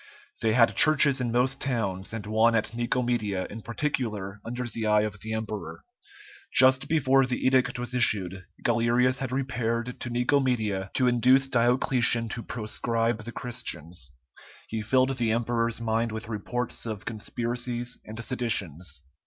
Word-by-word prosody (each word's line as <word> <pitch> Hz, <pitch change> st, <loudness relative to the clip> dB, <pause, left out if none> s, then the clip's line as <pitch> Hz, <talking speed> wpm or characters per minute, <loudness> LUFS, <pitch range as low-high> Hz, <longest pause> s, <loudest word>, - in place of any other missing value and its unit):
They 110 Hz, -1 st, +2 dB
had 115 Hz, 0 st, +5 dB
churches 145 Hz, -3 st, +5 dB
in 120 Hz, -2 st, -1 dB
most 130 Hz, +3 st, +1 dB
towns, 100 Hz, -8 st, -2 dB
and 110 Hz, -3 st, -5 dB
one 110 Hz, +2 st, +3 dB
at 110 Hz, 0 st, 0 dB
Nicomedia 120 Hz, -5 st, -1 dB
in 110 Hz, -, -7 dB
particular 110 Hz, -6 st, -3 dB
under 120 Hz, +2 st, -4 dB
the 115 Hz, -2 st, -3 dB
eye 105 Hz, 0 st, +4 dB
of 105 Hz, -1 st, -3 dB
the 110 Hz, -, -5 dB
emperor. 110 Hz, -1 st, -5 dB, 0.7 s
Just 130 Hz, 0 st, +5 dB
before 135 Hz, -4 st, +3 dB
the 125 Hz, -, -2 dB
edict 130 Hz, -1 st, +3 dB
was 125 Hz, 0 st, -4 dB
issued, 95 Hz, -6 st, +1 dB, 0.2 s
Galerius 120 Hz, +2 st, +2 dB
had 130 Hz, -2 st, -3 dB
repaired 125 Hz, -2 st, -2 dB
to 120 Hz, -, -3 dB
Nicomedia 120 Hz, -6 st, +1 dB
to 130 Hz, -, +3 dB
induce 125 Hz, +2 st, +4 dB
Diocletian 120 Hz, -1 st, +2 dB
to 115 Hz, +1 st, -4 dB
proscribe 115 Hz, 0 st, -2 dB
the 120 Hz, -, -5 dB
Christians. 85 Hz, -, -5 dB, 0.6 s
He 110 Hz, -1 st, -3 dB
filled 130 Hz, +4 st, +2 dB
the 115 Hz, -2 st, +1 dB
emperor's 115 Hz, 0 st, 0 dB
mind 115 Hz, 0 st, 0 dB
with 110 Hz, +1 st, -5 dB
reports 115 Hz, +2 st, -3 dB
of 105 Hz, -3 st, -5 dB
conspiracies 120 Hz, +2 st, -3 dB
and 110 Hz, +1 st, -9 dB
seditions. 90 Hz, -, -2 dB
115 Hz, 145 wpm, -27 LUFS, 110-125 Hz, 0.7 s, had